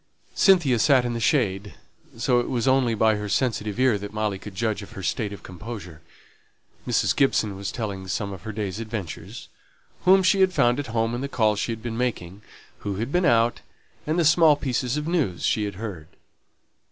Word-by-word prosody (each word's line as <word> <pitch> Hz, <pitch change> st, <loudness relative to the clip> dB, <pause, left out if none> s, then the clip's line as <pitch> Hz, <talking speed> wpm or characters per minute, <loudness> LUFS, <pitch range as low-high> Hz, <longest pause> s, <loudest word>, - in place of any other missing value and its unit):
Cynthia 170 Hz, -, +4 dB
sate 130 Hz, 0 st, +4 dB
in 120 Hz, -, -2 dB
the 115 Hz, -, -3 dB
shade, 105 Hz, -, 0 dB, 0.4 s
so 125 Hz, +1 st, +2 dB
it 120 Hz, -, -2 dB
was 125 Hz, -1 st, -1 dB
only 130 Hz, -3 st, +3 dB
by 110 Hz, 0 st, +3 dB
her 105 Hz, 0 st, -5 dB
sensitive 110 Hz, -3 st, -1 dB
ear 130 Hz, -5 st, +3 dB
that 100 Hz, 0 st, -7 dB
Molly 105 Hz, -2 st, -2 dB
could 105 Hz, -1 st, -10 dB
judge 110 Hz, +1 st, -1 dB
of 100 Hz, -, -11 dB
her 95 Hz, -, -8 dB
state 100 Hz, +4 st, -1 dB
of 100 Hz, -5 st, -9 dB
composure. 95 Hz, -4 st, -9 dB, 0.9 s
Mrs. -, -, +1 dB
Gibson 110 Hz, -7 st, +1 dB
was 95 Hz, 0 st, -5 dB
telling 100 Hz, -5 st, -5 dB
some 100 Hz, +1 st, -3 dB
of 95 Hz, -, -9 dB
her 110 Hz, -, -6 dB
day's 105 Hz, -1 st, -4 dB
adventures 105 Hz, -2 st, -6 dB, 0.6 s
whom 190 Hz, +1 st, +6 dB
she 190 Hz, +2 st, +3 dB
had 190 Hz, -1 st, +4 dB
found 120 Hz, -3 st, +2 dB
at 145 Hz, -, -4 dB
home 115 Hz, 0 st, -1 dB
in 120 Hz, -, -3 dB
the 140 Hz, -, -3 dB
calls 110 Hz, -5 st, +1 dB
she 115 Hz, -, -1 dB
had 115 Hz, 0 st, -6 dB
been 115 Hz, -1 st, -4 dB
making; 100 Hz, -6 st, -3 dB, 0.4 s
who 100 Hz, -1 st, -4 dB
had 115 Hz, +7 st, -3 dB
been 180 Hz, +2 st, +2 dB
out; 115 Hz, -5 st, +3 dB, 0.5 s
and 155 Hz, +2 st, 0 dB
the 170 Hz, -, +2 dB
small 160 Hz, -1 st, +6 dB
pieces 130 Hz, -1 st, -2 dB
of 150 Hz, +1 st, -3 dB
news 150 Hz, -, -1 dB
she 105 Hz, -, +1 dB
had 100 Hz, -2 st, -5 dB
heard. 95 Hz, -7 st, -7 dB
115 Hz, 200 wpm, -24 LUFS, 100-130 Hz, 0.9 s, whom